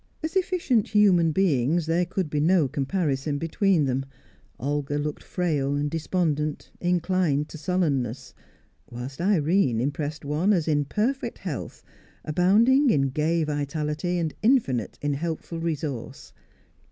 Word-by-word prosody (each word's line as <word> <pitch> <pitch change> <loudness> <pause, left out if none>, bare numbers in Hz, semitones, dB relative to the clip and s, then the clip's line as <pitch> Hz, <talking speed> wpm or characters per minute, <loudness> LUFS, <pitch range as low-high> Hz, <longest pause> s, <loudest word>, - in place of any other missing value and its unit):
As 315 +4 -3
efficient 350 - +1
human 190 -6 +4
beings, 160 -2 +2
there 170 +2 +1
could 190 -1 -2
be 150 0 -2
no 165 0 +3
comparison 145 0 -1
between 165 +1 +1
them; 135 0 -1 0.6
Olga 145 +2 -1
looked 150 0 -3
frail, 150 -6 -1
despondent, 155 -1 -1
inclined 175 -4 +1
to 160 - -9
sullenness, 140 -8 -1 0.6
whilst 125 +5 -7
Irene 170 - +2
impressed 145 +3 -3
one 155 +8 +2
as 170 -5 0
in 145 -2 +2
perfect 240 - -1
health, - - -6 0.4
abounding 220 - +4
in 135 - +2
gay 160 +4 0
vitality, 150 +3 -2
infinite 215 - +1
in 145 0 +1
helpful 165 +2 -4
resource. 150 -7 -4
155 Hz, 120 wpm, -25 LUFS, 145-180 Hz, 0.6 s, human